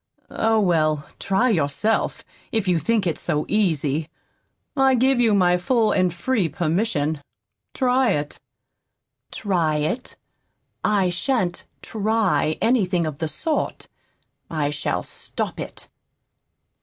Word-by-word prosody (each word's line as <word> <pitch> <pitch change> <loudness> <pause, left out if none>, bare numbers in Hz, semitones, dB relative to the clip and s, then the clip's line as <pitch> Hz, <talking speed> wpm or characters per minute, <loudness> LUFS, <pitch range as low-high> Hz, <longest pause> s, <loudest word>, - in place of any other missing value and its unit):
Oh, 225 0 +2
well, 155 -6 +2
try 195 +6 +2
yourself, 175 +6 0 0.3
if 220 -4 0
you 175 -2 +3
think 215 +5 +1
it's 165 -3 -1
so 150 0 0
easy. 160 -7 0 0.7
I 270 -1 +4
give 260 +1 +3
you 225 -4 +4
my 180 -2 +4
full 220 +4 +2
and 185 -2 +2
free 185 +1 0
permission. 160 -3 0 0.5
Try 255 -1 +3
it." 145 0 -4 0.9
"TRY 170 -7 0
it! 155 +12 -2 0.7
I 195 -4 +2
shan't 185 -1 -1 0.2
TRY 215 -7 +1
anything 185 -8 +2
of 155 -2 -5
the 160 - -1
sort. 310 - -3 0.6
I 150 -3 -1
shall 150 - -2
STOP - - -5
it." - - -7
185 Hz, 120 wpm, -23 LUFS, 155-225 Hz, 0.9 s, I